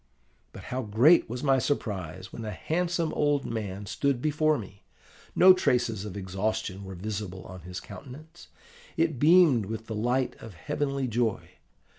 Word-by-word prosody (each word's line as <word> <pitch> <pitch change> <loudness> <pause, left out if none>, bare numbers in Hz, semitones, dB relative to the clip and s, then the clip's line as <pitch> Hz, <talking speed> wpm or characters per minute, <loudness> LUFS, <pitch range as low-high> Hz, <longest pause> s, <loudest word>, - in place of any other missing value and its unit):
But - - -11
how 130 - -1
great 120 +10 +4
was 125 +3 -5
my 135 -2 +4
surprise 95 - -3
when 115 - -6
a 110 - -4
handsome 170 - -1
old 145 -2 +1
man 105 -3 -4
stood 140 +5 0
before 155 +2 +2
me! 100 -3 -10 0.5
No 185 +1 +8
traces 120 - 0
of 100 -1 -6
exhaustion 100 +1 -3
were 95 -1 -8
visible 100 -1 -5
on 95 0 -10
his 90 +2 -7
countenance: 130 +11 -12 0.5
it 160 -5 +1
beamed 150 - +5
with 110 +1 -5
the 110 - -6
light 120 +4 0
of 110 -5 -11
a - - -17
heavenly 140 - -2
joy. 115 -2 -1
115 Hz, 160 wpm, -28 LUFS, 100-145 Hz, 0.5 s, No